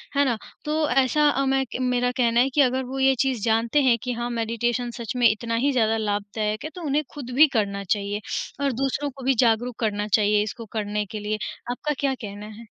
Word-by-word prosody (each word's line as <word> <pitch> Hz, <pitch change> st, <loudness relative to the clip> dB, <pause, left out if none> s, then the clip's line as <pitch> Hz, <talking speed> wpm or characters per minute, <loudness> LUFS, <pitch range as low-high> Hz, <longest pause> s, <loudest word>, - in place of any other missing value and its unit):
है 285 Hz, 0 st, +4 dB
ना? 240 Hz, -4 st, +1 dB, 0.3 s
तो 305 Hz, 0 st, +1 dB
ऐसा 275 Hz, +1 st, +3 dB
मैं 270 Hz, 0 st, +2 dB, 0.2 s
मेरा 250 Hz, -1 st, +1 dB
कहना 235 Hz, -2 st, +3 dB
है 255 Hz, +2 st, +4 dB
कि 295 Hz, -, +4 dB
अगर 260 Hz, 0 st, +2 dB
वो 265 Hz, +2 st, -5 dB
ये 265 Hz, 0 st, +5 dB
चीज़ 260 Hz, -2 st, +1 dB
जानते 230 Hz, +5 st, +2 dB
हैं 245 Hz, -3 st, +4 dB
कि 250 Hz, -, -2 dB
हाँ 240 Hz, +1 st, -3 dB
मेडिटेशन 235 Hz, +1 st, -1 dB
सच 230 Hz, -3 st, -4 dB
में 245 Hz, -1 st, +5 dB
इतना 230 Hz, +2 st, -2 dB
ही 275 Hz, +5 st, +2 dB
ज़्यादा 225 Hz, -4 st, +2 dB
लाभदायक 210 Hz, 0 st, -2 dB
है 310 Hz, -, -4 dB
तो 360 Hz, -, -7 dB
उन्हें 295 Hz, +1 st, +1 dB
खुद 280 Hz, -5 st, -7 dB
भी 310 Hz, +4 st, +8 dB
करना 200 Hz, -3 st, 0 dB
चाहिए, 200 Hz, +1 st, -1 dB, 0.4 s
और 280 Hz, -1 st, +2 dB
दूसरों 270 Hz, +3 st, -1 dB
को 270 Hz, -1 st, -11 dB
भी 270 Hz, -, +4 dB
जागरूक 235 Hz, +1 st, +1 dB
करना 210 Hz, -2 st, -1 dB
चाहिए 210 Hz, 0 st, +3 dB
इसको 225 Hz, +2 st, -6 dB
करने 210 Hz, 0 st, -1 dB
के 215 Hz, +2 st, -6 dB
लिए, 210 Hz, +1 st, -2 dB, 0.3 s
आपका 295 Hz, +4 st, -2 dB
क्या 275 Hz, -2 st, +1 dB
कहना 205 Hz, 0 st, -7 dB
है? 230 Hz, -, -11 dB
240 Hz, 215 wpm, -24 LUFS, 215-270 Hz, 0.4 s, भी